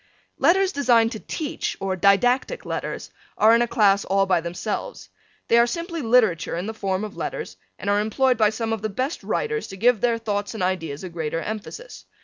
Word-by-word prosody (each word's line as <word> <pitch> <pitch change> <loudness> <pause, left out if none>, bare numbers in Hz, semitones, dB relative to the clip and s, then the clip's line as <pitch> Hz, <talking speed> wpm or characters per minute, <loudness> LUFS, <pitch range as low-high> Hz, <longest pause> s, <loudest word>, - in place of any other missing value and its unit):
Letters 385 +2 +4
designed 240 - +3
to 220 - -6
teach 300 +5 -4
or 195 -1 -2
didactic 245 - +2
letters - - -5 0.3
are 220 +2 +6
in 235 - +4
a 240 - +2
class 200 -3 +3
all 195 0 +2
by 185 -3 +2
themselves. 200 - -5 0.4
They 235 - +5
are 235 - +5
simply 335 +3 -4
literature 225 - +2
in 175 - -3
the 220 - -4
form 195 -2 -2
of 210 -1 -6
letters - - -5 0.2
and - - -8
are 205 0 +3
employed 250 +4 +2
by 215 -2 +3
some 225 +1 -3
of 220 - -3
the 215 - -2
best 260 +9 -3
writers 445 -1 -2
to 195 - -9
give 230 +1 +3
their 235 -1 +2
thoughts 205 -1 -3
and 215 - -3
ideas 165 -5 -2
a 185 - -5
greater 165 -1 -3
emphasis. 220 - -7
220 Hz, 200 wpm, -23 LUFS, 195-250 Hz, 0.4 s, are